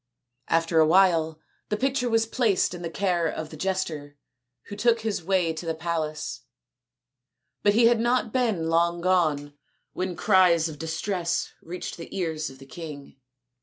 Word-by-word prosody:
After 165 0 +2
a 155 - +6
while 165 -3 +3 0.3
the 210 - 0
picture 265 0 0
was 225 0 +2
placed 225 -6 +1
in 175 - -7
the 170 - -4
care 175 -1 0
of 160 0 -5
the - - -8
jester, 155 -5 -3 0.5
who 205 - -8
took 230 +2 +2
his 215 -5 -2
way 180 -2 +1
to 160 - -7
the 165 -1 -2
palace; 155 -5 -3 1.2
but 205 0 +3
he 230 +1 +5
had 235 0 +5
not 240 -1 +1
been 220 -10 +1
long 170 +1 +2
gone 155 -6 +1 0.4
when 185 -1 -3
cries 180 -3 +4
of 150 -2 -8
distress 170 +2 -2
reached 180 +2 -6
the 170 +3 -8
ears 160 -4 -2
of 135 - -13
the 135 - -13
king. 145 -2 -9
170 Hz, 165 wpm, -26 LUFS, 160-200 Hz, 1.2 s, a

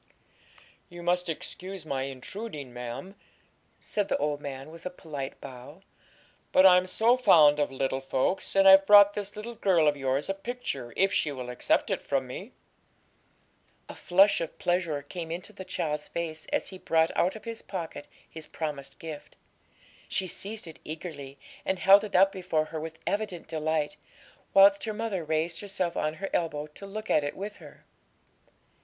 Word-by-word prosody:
'You 175 -1 -10
must 180 0 +1
excuse 185 +2 -6
my 135 -3 -2
intruding, 140 - -7
ma'am,' 125 +9 -6 0.7
said 205 -2 -2
the - - +1
old 145 0 -1
man, 135 +1 -7
with 165 0 -12
a - - -3
polite 150 -6 -7
bow; 125 -2 -11 0.7
'but 185 - +6
I'm 180 -1 +7
so 225 +6 +3
fond 150 -12 +6
of 145 - +1
little 135 0 -1
folks, 135 +9 -1
and 195 0 +6
I've 195 0 +8
brought 205 0 +8
this 205 0 -5
little 220 +3 -6
girl 185 -8 +3
of 145 - +3
yours 135 +1 -1
a 195 - 0
picture, 195 - -5
if 195 +1 +3
she 150 - +1
will 125 -3 -6
accept 125 - +1
it - - -1
from - - -1
me.' - - -8 1.4
A - - -8
flush 195 +2 +4
of 165 - -5
pleasure 175 -5 0
came 165 +3 -7
into 180 +5 -6
the 190 - -8
child's 150 -5 -3
face 160 -2 -5
as - - -1
he 190 - -10
brought 160 -1 +2
out 180 +4 +2
of 220 - -11
his 230 -1 -6
pocket 170 -6 -6 0.2
his 160 -1 -10
promised 140 -3 -5
gift. 155 -3 -9 0.7
She 190 - 0
seized 205 +4 -6
it 160 -2 -11
eagerly, 155 -4 -7 0.3
and 190 - -1
held 195 +3 +7
it 210 - -5
up 195 +1 +6
before 165 -5 -1
her 160 0 -6
with 160 +1 -7
evident 205 -4 -2
delight, 155 +2 -1 0.5
whilst 195 +2 +6
her 215 - -2
mother 210 -5 -3
raised 160 +2 -1
herself 190 -4 -3
on 155 +1 -1
her 195 +4 -5
elbow 150 -3 -1
to 200 - -10
look 215 +2 -5
at 150 - +4
it 145 - -4
with 205 +2 -6
her. - - -15
170 Hz, 175 wpm, -28 LUFS, 150-195 Hz, 1.4 s, I've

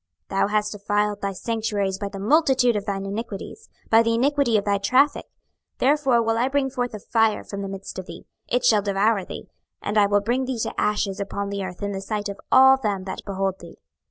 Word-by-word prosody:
26:028:018 195 - -1
Thou - - +3
hast 210 0 0
defiled 205 0 -1
thy 200 - -1
sanctuaries 205 -2 -2
by 200 -1 -3
the 195 - -8
multitude 260 +1 +3
of 205 -1 -3
thine 195 -1 -2
iniquities, 220 - -6 0.2
by 225 0 +7
the 230 0 +1
iniquity 270 -2 +2
of 200 - -2
thy 200 -1 +1
traffick; 255 +8 +2 0.5
therefore 270 -3 +3
will 225 0 0
I 250 - +2
bring 270 -1 0
forth 245 -3 -3
a - - -6
fire 225 +1 +1
from 200 -1 -6
the 195 - -4
midst 195 0 -7
of 185 - -8
thee, - - -10 0.2
it 245 0 0
shall 215 -4 +5
devour 200 +1 +1
thee, - - -9 0.3
and 210 +1 0
I 205 - +5
will 205 0 +2
bring 245 +5 0
thee 255 -1 -3
to - - -3
ashes 205 -2 0
upon 200 0 -3
the 200 -1 -3
earth 185 +1 -7
in 200 - -2
the 195 -1 -4
sight 205 +1 -3
of 200 - -7
all 265 +1 +7
them 205 -7 -2
that 190 - -6
behold 195 -1 -2
thee. 170 -1 -13
210 Hz, 225 wpm, -23 LUFS, 200-240 Hz, 0.5 s, by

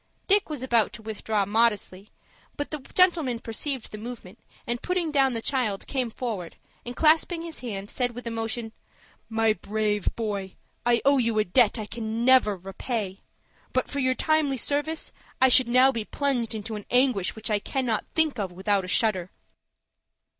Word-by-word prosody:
Dick 405 -1 +4
was 295 -5 -4
about 235 -4 +2
to 220 - -10
withdraw 215 -1 -1
modestly, 210 -2 0 0.5
but 290 - -4
the 305 - -3 0.2
gentleman 335 -9 +3
perceived 235 +3 -3
the 215 - -7
movement, 225 -3 -9 0.3
and, 240 0 -2
putting 360 -3 -1
down 270 -3 +3
the 225 -1 -4
child, 240 -8 -1
came 255 -4 -2
forward, 220 -8 -5 0.3
and, 245 +1 -6
clasping 325 +3 +3
his 335 -2 -8
hand, 200 -5 -5
said 245 +1 -2
with 245 - -8
emotion, 225 0 -3 0.6
"My 225 -1 +2
brave 210 +1 -1
boy, 200 -4 -3 0.3
I 235 -1 +3
owe 280 0 +5
you 230 -3 +1
a 215 - +4
debt 210 +4 +3
I 215 - -4
can 225 +1 -3
never 255 -5 +5
repay. 195 +2 -4 0.5
But - - 0
for 285 - -2
your 260 -1 +2
timely 310 -3 +1
service 295 +5 -2 0.3
I 260 - +6
should 255 0 +6
now 255 +2 +6
be 230 -4 -3
plunged 245 -5 -1
into 220 +1 -5
an 210 - -8
anguish 245 -7 +2
which 220 0 -4
I 210 - +3
cannot 245 -1 -1
think 310 -6 +2
of 190 -3 -2
without 190 +2 0
a - - -7
shudder." 185 -3 +1
235 Hz, 175 wpm, -26 LUFS, 210-265 Hz, 0.6 s, I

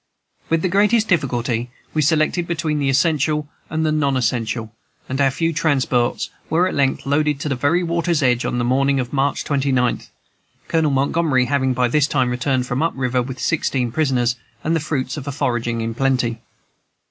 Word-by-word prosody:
With 165 0 +1
the - - +3
greatest 210 +4 +3
difficulty 125 - 0 0.2
we 155 - +1
selected 155 +3 +1
between 160 -3 -1
the 140 -1 +1
essential 150 +1 +1 0.2
and 160 0 -1
the 155 - +2
non 140 -3 +1
essential, 115 -2 -2 0.3
and 135 +2 -2
our 135 - +4
few 165 +5 -1
transports 135 -6 0 0.2
were 170 +3 +3
at - - -3
length 135 -2 0
loaded 145 0 +1
to 150 - -2
the 135 - 0
very 145 +8 +1
water's 170 -2 0
edge 125 -2 +2
on - - -2
the 120 - 0
morning 135 +3 +2
of 125 +1 -4
March 140 0 0
29th, 135 -3 0 0.6
Colonel 160 -2 +2
Montgomery 140 -1 +1
having 130 -1 +1
by 125 0 +2
this 145 +4 +2
time 130 -5 +1
returned 125 +1 0
from 125 +2 -2
up 165 - +1
river, 125 -1 0
with 130 +1 -6
sixteen 130 -6 0
prisoners, 125 -4 +1 0.3
and 160 +2 +1
the - - +1
fruits 145 -3 -3
of 140 - -6
foraging 120 -3 -1
in 115 0 -2
plenty. 125 -3 0
135 Hz, 180 wpm, -20 LUFS, 125-155 Hz, 0.6 s, our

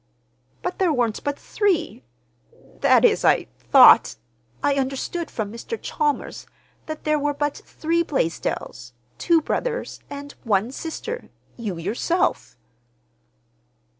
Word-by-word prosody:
"But 360 - -3
there 370 -3 +3
weren't 240 -6 0
but 285 -1 -2
three—that 120 - -1
is, - - +3
I - - +4 0.2
thought—I 120 - +4
understood 275 +5 -2
from 215 -2 -4
Mr. 235 - -5
Chalmers 445 -1 -2 0.4
that 310 -1 -6
there 305 0 +1
were 290 0 -1
but 290 0 -1
three 330 +2 -1
Blaisdells, 160 - -3 0.3
two 335 -2 +3
brothers, - - -3
and 285 0 -7
one 215 +1 +1
sister—you, 295 - -7
yourself." 220 - -1
280 Hz, 105 wpm, -23 LUFS, -, 0.4 s, I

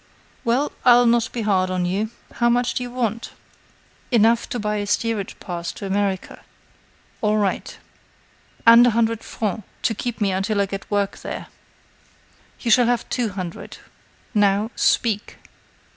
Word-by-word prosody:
Well, 260 +4 +1
I'll 245 0 +6
not 235 -1 +2
be 235 - -3
hard 190 -3 +2
on 180 -1 -1
you. 200 +5 -1 0.3
How 240 0 +3
much 245 +1 +1
do - - -2
you 245 - -4
want?" 235 -2 -3 0.8
"Enough 230 -1 +3
to - - -3
buy 210 -1 -1
a 205 0 -3
steerage 215 -1 -1
pass 170 -2 -5
to 200 - -8
America." 195 -1 -2 0.8
"All 215 0 +2
right." 200 -3 -1 0.9
"And 235 +1 +8
a 230 -2 +1
hundred 230 -1 +1
francs 215 -1 -3 0.2
to 225 - +2
keep 235 +2 -4
me 200 -3 +1
until 195 +3 -1
I 200 - +3
get 195 0 -7
work 205 -1 -1
there." - - -7 1.1
"You 235 - 0
shall 245 +1 +5
have 240 -1 0
two 240 -3 -1
hundred. 185 -4 -7 0.6
Now, 205 +1 +2
speak." 215 -3 +1
215 Hz, 155 wpm, -22 LUFS, 200-235 Hz, 1.1 s, And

